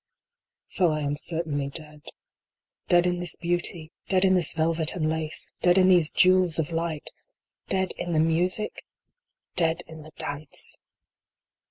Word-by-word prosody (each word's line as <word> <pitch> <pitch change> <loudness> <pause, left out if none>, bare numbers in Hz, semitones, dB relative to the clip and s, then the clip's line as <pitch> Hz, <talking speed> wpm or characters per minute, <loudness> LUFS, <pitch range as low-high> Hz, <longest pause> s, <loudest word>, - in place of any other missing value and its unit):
So 180 -3 +1
I 155 -1 -1
am 145 0 -1
certainly 150 -3 -2
dead. 150 0 -7 0.9
Dead 175 0 +4
in 180 0 0
this 175 -2 +1
beauty! 175 -2 -3 0.2
Dead 190 0 +3
in 190 - +4
this 180 -3 +4
velvet 160 0 0
and 155 -3 -1
lace! 160 0 -1
Dead 175 +1 +4
in 185 0 +5
these 175 -4 +5
jewels 185 -2 +4
of 160 0 -1
light! 165 -2 -3 0.6
Dead 190 -1 0
in 175 - -3
the 160 - +2
music! 175 +6 0 0.7
Dead 165 0 +2
in 160 -1 -11
the 155 - -12
dance 145 0 -5
165 Hz, 150 wpm, -26 LUFS, 155-180 Hz, 0.9 s, in